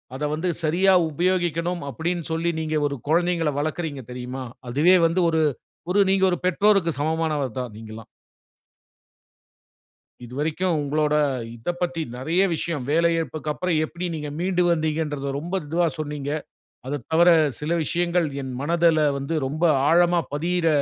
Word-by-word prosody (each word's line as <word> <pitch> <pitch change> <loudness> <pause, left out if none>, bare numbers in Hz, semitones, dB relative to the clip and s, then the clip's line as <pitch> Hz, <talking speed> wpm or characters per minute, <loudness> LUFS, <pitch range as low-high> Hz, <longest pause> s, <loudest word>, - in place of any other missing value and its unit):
அத 145 - -5
வந்து 165 +4 -1
சரியா 180 +5 +3 0.2
உபயோகிக்கணும் 175 0 0
அப்பிடீன்னு 170 +6 -3
சொல்லி, 165 +1 0
நீங்க 155 0 -2
ஒரு 140 - -4
குழந்தைகள 170 -2 +2
வளர்க்குறீங்க 155 -3 -3
தெரியுமா, 125 +1 -6 0.3
அதுவே 155 +9 +4
வந்து 170 +3 0
ஒரு 160 - +2 0.5
ஒரு 200 - +3
நீங்க 190 0 +2
ஒரு 175 - 0
பெற்றோருக்கு 195 -1 +3
சமமானவர் 155 -3 0
தான், 125 - -3
நீங்கல்லாம். 110 0 -10 2.2
இதுவரைக்கும் 155 +8 -1
உங்களோட 150 +1 0 0.4
இத 115 +9 -3
பத்தி 175 -1 -1 0.2
நிறைய 160 +9 +1
விஷயம், 155 -5 -3
வேலை 170 +2 +3
இழப்புக்கப்புறம் 160 +2 -2
எப்டி 175 +3 -5
நீங்க 150 -2 -4
மீண்டு 180 0 +1
வந்தீங்கன்றத 155 -3 -1
ரொம்ப 170 +5 -7
இதுவா 170 +3 +1
சொன்னீங்க. 145 -2 -4 0.6
அதத் 135 -2 -4
தவர, 170 +2 +6 0.3
சில 150 +2 -3
விஷயங்கள் 175 0 +1 0.2
என் 130 -1 -5
மனதுல 165 +1 +3 0.2
வந்து 140 +4 -3
ரொம்ப 155 +5 -2 0.2
ஆழமா 175 +1 +4
பதியிற, 170 +3 0
160 Hz, 135 wpm, -24 LUFS, 145-175 Hz, 2.2 s, தவர